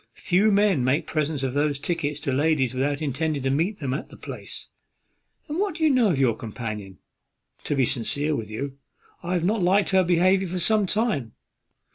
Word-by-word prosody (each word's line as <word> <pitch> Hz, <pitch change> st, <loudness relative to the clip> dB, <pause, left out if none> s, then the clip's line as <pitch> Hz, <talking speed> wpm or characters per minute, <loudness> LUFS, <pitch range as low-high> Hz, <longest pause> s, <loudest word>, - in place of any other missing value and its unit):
Few 200 Hz, +5 st, +2 dB
men 200 Hz, -8 st, +3 dB
make 130 Hz, +5 st, +1 dB
presents 150 Hz, -2 st, -1 dB
of 130 Hz, -1 st, -1 dB
those 145 Hz, 0 st, +1 dB
tickets 150 Hz, -1 st, -2 dB
to 135 Hz, -, -1 dB
ladies 140 Hz, -3 st, +2 dB
without 140 Hz, +3 st, -1 dB
intending 145 Hz, 0 st, -1 dB
to 135 Hz, -, +1 dB
meet 170 Hz, +9 st, 0 dB
them 135 Hz, -4 st, -3 dB
at 140 Hz, -, -4 dB
the -, -, -13 dB
place. -, -, -7 dB, 0.8 s
And 305 Hz, +3 st, -3 dB
what 395 Hz, -5 st, 0 dB
do 325 Hz, -, -3 dB
we 310 Hz, -, +5 dB
know 250 Hz, -5 st, +4 dB
of 165 Hz, -, +1 dB
your 130 Hz, -5 st, +2 dB
companion? 105 Hz, -4 st, -6 dB, 0.7 s
To 145 Hz, -, 0 dB
be 135 Hz, -2 st, +3 dB
sincere 145 Hz, +5 st, 0 dB
with 110 Hz, -4 st, -5 dB
you, 135 Hz, +5 st, -5 dB, 0.4 s
I 175 Hz, +1 st, -3 dB
have 175 Hz, -2 st, 0 dB
not 210 Hz, +3 st, +1 dB
liked 195 Hz, +4 st, +3 dB
her 190 Hz, -1 st, +5 dB
behaviour 185 Hz, +2 st, +3 dB
for 180 Hz, +2 st, -4 dB
some 205 Hz, +3 st, +2 dB
time. 205 Hz, -, 0 dB
155 Hz, 195 wpm, -25 LUFS, 135-190 Hz, 0.8 s, we